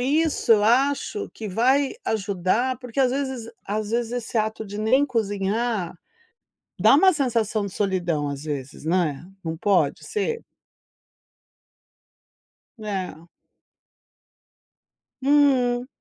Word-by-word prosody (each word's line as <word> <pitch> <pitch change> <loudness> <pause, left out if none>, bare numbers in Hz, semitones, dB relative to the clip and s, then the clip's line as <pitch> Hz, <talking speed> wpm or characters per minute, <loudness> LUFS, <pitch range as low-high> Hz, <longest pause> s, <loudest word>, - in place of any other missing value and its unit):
isso 300 +2 +1
eu 210 -1 +4
acho 280 - +1
que 220 - -6
vai 260 +7 +2
ajudar, 215 +4 0
porque 250 0 -8
às 255 -2 +4
vezes 265 -4 -3
às 210 +1 -3
vezes 235 -1 0
esse 240 -1 -4
ato 220 0 -2
de 205 +1 -7
nem 260 +7 +3
cozinhar, 205 -3 -1 0.8
dá 220 +7 +6
um 375 +5 +6
sensação 230 -7 0
de 195 - -7
solidão 175 -7 -1
às 140 +1 -6
vezes, 145 -1 -6
né. 165 -3 0 0.2
Não 160 0 -4
pode 175 -7 +1
ser? 460 +2 -2 2.3
É. 190 -6 -5 1.9
Hum. 260 -3 +3
220 Hz, 110 wpm, -24 LUFS, 190-260 Hz, 2.3 s, dá